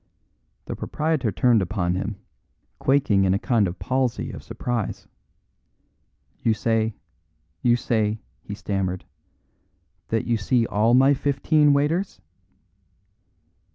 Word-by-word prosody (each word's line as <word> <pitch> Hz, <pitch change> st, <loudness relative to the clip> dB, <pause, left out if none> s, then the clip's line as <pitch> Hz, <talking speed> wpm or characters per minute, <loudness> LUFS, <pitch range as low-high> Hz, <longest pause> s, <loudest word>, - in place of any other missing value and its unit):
The -, -, -5 dB
proprietor 150 Hz, -7 st, -1 dB
turned 120 Hz, 0 st, +3 dB
upon 90 Hz, -1 st, -1 dB
him, 100 Hz, +3 st, -3 dB, 0.6 s
quaking 130 Hz, -8 st, +3 dB
in 95 Hz, 0 st, +3 dB
a -, -, +2 dB
kind 110 Hz, -2 st, +1 dB
of 90 Hz, +1 st, -5 dB
palsy 130 Hz, 0 st, -1 dB
of -, -, -8 dB
surprise. 120 Hz, -5 st, -4 dB, 1.3 s
"You 110 Hz, -, +2 dB
say 110 Hz, -1 st, 0 dB, 0.7 s
you 120 Hz, -1 st, +4 dB
say," 110 Hz, -3 st, 0 dB, 0.2 s
he 100 Hz, -, -7 dB
stammered, 95 Hz, -3 st, -3 dB, 1.0 s
"that 115 Hz, -1 st, -1 dB
you 115 Hz, -1 st, +1 dB
see 115 Hz, +3 st, +1 dB
all 110 Hz, +3 st, +2 dB
my 135 Hz, +2 st, +6 dB
fifteen 145 Hz, +2 st, +2 dB
waiters?" 155 Hz, +7 st, 0 dB
115 Hz, 115 wpm, -24 LUFS, 100-135 Hz, 1.3 s, my